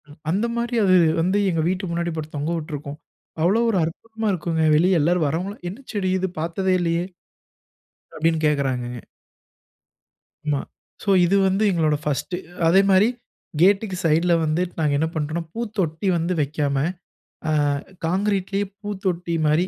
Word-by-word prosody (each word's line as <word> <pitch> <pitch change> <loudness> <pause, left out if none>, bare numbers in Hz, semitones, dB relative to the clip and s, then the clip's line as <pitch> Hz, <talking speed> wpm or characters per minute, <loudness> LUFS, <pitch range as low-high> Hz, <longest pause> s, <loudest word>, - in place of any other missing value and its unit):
ம். 145 - -14
அந்த 195 +7 +1
மாரி 235 +1 -2
அது 185 -2 +5 0.3
வந்து 185 +4 +1
எங்க 165 -3 0
வீட்டு 185 0 -2
முன்னாடி 170 0 -1
போட்டு 155 -1 -6
தொங்க 145 +3 -2
விட்டுருக்கும். 150 -2 -6 0.4
அவ்வளோ 195 +8 +3
ஒரு 200 - +1
அற்புதமா 220 +7 -4
இருக்கும்ங்க. 165 -2 -1
வெளிய 175 +3 +4
எல்லாரும் 170 +1 +2
வர்றவங்கல்லாம், 180 +6 -4
"என்ன 195 - -8
செடி 195 -3 0
இது? 190 0 -1
பார்த்ததே 180 +4 0
இல்லையே." 170 0 0 1.1
அப்படின்னு 160 0 +1
கேட்கறாங்கங்க. 130 -5 -1 1.5
ஆமா. 145 -2 +1 0.4
சோ 205 - -2 0.2
இது 185 +3 +2
வந்து 190 +3 +1
எங்களோட 160 -4 +2
ஃபர்ஸ்ட்டு. 150 +5 -2 0.3
அதே 185 +4 +6
மாரி 190 +3 +5 0.5
கேட்டுக்கு 195 +1 +3
சைட்ல 165 +2 +3
வந்து 155 +3 0 0.2
நாங்க 150 -2 +2
என்ன 160 - +1
பண்றோம்ன்னா, 155 +2 -2
பூத்தொட்டி 205 -7 -2
வந்து 170 +2 -1
வைக்காம, 145 -1 -1 0.7
அ - - +1 0.5
கான்கிரீட்லேயே 195 +2 0 0.2
பூத்தொட்டி 190 -4 -3
மாரி 155 +4 +3
170 Hz, 140 wpm, -23 LUFS, 155-190 Hz, 1.5 s, அதே